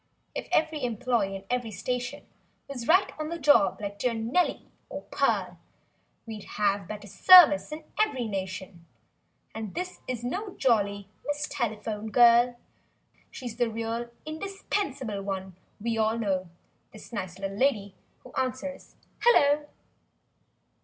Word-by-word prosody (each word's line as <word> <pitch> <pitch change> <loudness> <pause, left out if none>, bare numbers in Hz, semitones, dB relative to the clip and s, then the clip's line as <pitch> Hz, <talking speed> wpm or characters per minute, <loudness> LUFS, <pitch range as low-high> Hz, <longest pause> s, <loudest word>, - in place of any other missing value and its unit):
If - - -5
every 310 -2 +1
employee 235 -4 0
in 195 - -7
every 245 -2 -1
station. 245 +4 -4 0.4
Was 250 -4 -6
right 370 +4 +4
on 310 0 -3
the 335 - -3
job 275 - +4
like 205 -1 -6
dear 245 -2 0
"Nellie" 230 +11 0 0.2
or - - -6
"Pearl"— - - 0 0.7
We'd 220 -3 -8
have 200 -1 +1
better 210 -1 -7
"service" 300 - +7
in 310 +1 -6 0.2
every 275 - +1
nation— 190 -3 -5 0.7
And 220 -3 -6
this 365 +1 -5
is 245 -2 -4
no 380 - -4
jolly—"Miss 215 +5 0
Telephone 220 -2 -3
Girl." 240 +1 +6 0.7
She's 240 -3 -7
the 240 -2 +1
real 230 +1 -3 0.2
indispensable 310 - -3
one 190 -2 -5 0.2
we 225 +1 -1
all 220 +1 +2
know— 190 -5 -1 0.4
This 215 +2 -13
nice 185 -4 -4
little 195 0 -4
lady 210 -5 +1 0.3
who 255 - -14
answers—"Hello!" 285 - +1
235 Hz, 125 wpm, -28 LUFS, 205-280 Hz, 0.7 s, service